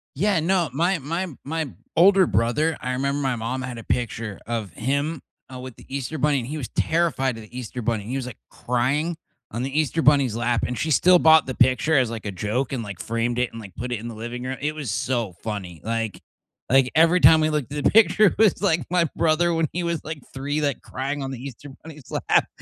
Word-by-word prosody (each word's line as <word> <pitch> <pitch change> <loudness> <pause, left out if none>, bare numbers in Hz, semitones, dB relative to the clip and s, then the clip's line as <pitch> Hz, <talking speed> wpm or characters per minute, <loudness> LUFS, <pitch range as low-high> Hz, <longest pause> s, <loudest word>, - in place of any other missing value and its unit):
Yeah, 190 +3 +2
no, 175 -1 +1
my 170 +5 +1
my 165 +7 -3 0.2
my 160 0 -3 0.3
older 190 +2 +6
brother, 145 +8 +1
I 130 - -2
remember 140 +2 -1
my 130 -2 0
mom 120 +3 -3
had 125 -2 -6
a - - -9
picture 110 -4 -3
of 110 -5 -3
him, 140 - -1 0.3
uh, 130 - -7
with 130 -2 -8
the - - -16
Easter 140 +3 -4
Bunny, 145 0 +2
and 120 - -6
he 150 +3 -4
was 130 -7 -5
terrified 160 -6 +1
of - - -8
the 115 +4 -11
Easter 125 0 -5
Bunny, 110 -2 -1
he 125 +5 -4
was, 135 -2 -3
like, 125 - -8
crying 140 +7 -1 0.3
on 115 - -3
the 135 +3 -1
Easter 155 +1 0
Bunny's 140 -7 +4
lap 120 0 0
and 125 - -3
she 160 - -1
still 180 +4 +5
bought 160 -1 +6
the 130 - -4
picture 130 +6 +3
as, 130 -4 +3
like, 115 -2 -6
a 100 - -2
joke 110 +8 -2
and, 125 -3 -2
like, 100 -4 -8
framed 115 +1 -2
it 125 - 0
and, 115 - -8
like, 95 -4 -12
put 125 +1 -5
it 120 - -2
in 115 - -7
the 115 - -7
living 120 +3 -6
room, 130 +1 -4
it 150 +1 -1
was 145 -9 -4
so 115 -3 -1
funny, 95 -7 -5
like 115 -2 -3 0.5
like 135 0 +4
every 165 +3 +5
time 160 -2 +7
we 155 - +2
looked 150 -3 -2
at 145 -1 -3
the - - +5
picture, 215 0 +5
it - - -1
was, 220 -2 +3
like, 165 -8 +1
my 175 -2 +3
brother 165 +2 +2
when 165 -1 +1
he 180 - -1
was, 170 -1 -2
like, 155 -1 -6
3, 145 +3 -2
like, 140 -3 -1
crying 140 +2 -4
on 135 - -4
the 130 - -6
Easter 140 +1 -9
Bunny's 150 -4 -12
lap. - - +2
135 Hz, 240 wpm, -23 LUFS, 120-160 Hz, 0.5 s, time